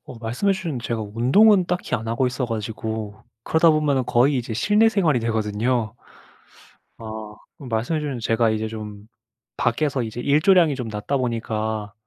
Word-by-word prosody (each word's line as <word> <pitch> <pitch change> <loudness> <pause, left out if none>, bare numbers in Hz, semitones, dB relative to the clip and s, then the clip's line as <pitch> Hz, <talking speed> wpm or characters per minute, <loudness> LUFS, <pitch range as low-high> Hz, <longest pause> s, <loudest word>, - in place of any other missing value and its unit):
어 115 - -11
말씀해 120 - 0
주셨는데 165 -11 -4
제가 115 -2 -2
운동은 185 - +5
딱히 180 0 -2
안 110 0 -3
하고 115 +3 +1
있어 125 +1 -2
가지고 110 -1 -5 0.2
그러다 160 +1 +4
보면은 145 -4 +1
거의 130 +5 +3
이제 120 -2 -3
실내 210 - +3
생활이 165 - +1
되거든요. 110 +1 -1 1.0
아. 110 -1 -8 0.2
그 145 - -11
말씀해 120 +6 -1
주셨는데 140 -5 -4
제가 115 0 +2
이제 110 0 -2
좀 105 -1 -8 0.5
밖에서 130 +1 0
이제 115 +1 -5
일조량이 155 +3 +4
좀 125 -3 -5
낮다 105 +6 -3
보니까 110 -4 -2
120 Hz, 355 characters per minute, -22 LUFS, 110-145 Hz, 1.0 s, 운동은